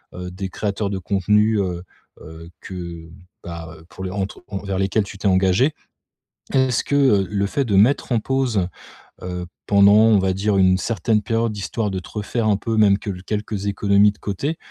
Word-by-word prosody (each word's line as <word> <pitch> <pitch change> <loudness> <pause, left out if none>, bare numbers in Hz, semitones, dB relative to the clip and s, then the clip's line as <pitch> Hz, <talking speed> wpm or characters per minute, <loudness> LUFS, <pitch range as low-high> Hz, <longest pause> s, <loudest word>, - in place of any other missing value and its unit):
heu, 90 0 -6
des 95 +1 -5
créateurs 100 +1 -2
de 100 - -3
contenu, 105 +3 +2
heu 90 -2 -3 0.4
heu, 80 +1 -11
que 85 -3 -8 0.3
bah, 80 -2 -8
pour 95 - -9
les 95 - -4
entre 100 0 -4
envers 100 -1 -3
lesquels 95 +2 +1
tu 100 - -10
t'es 100 - 0
engagé. 95 +9 +3 0.8
Est-ce 130 -2 +2
que, 145 - -1
heu, 105 -9 +3
le 100 -1 0
fait 140 +7 -1
de 105 -5 0
mettre 120 +8 +3
en 115 - +3
pause, 120 -6 0 0.6
heu, 90 -1 -4 0.2
pendant, 100 0 +6
on 110 0 +6
va 95 0 +1
dire, 100 +2 0
une 95 -1 +4
certaine 110 +1 0
période, 115 +1 -1
histoire 105 +1 -2
de 95 - -2
te 90 - -12
refaire 110 +2 -2
un 105 - +3
peu, 115 +2 -2
même 100 -2 +5
que - - -6
quelques 105 0 -4
économies 100 0 +3
de - - -25
côté? 140 - -3
100 Hz, 190 wpm, -21 LUFS, 95-110 Hz, 0.8 s, pendant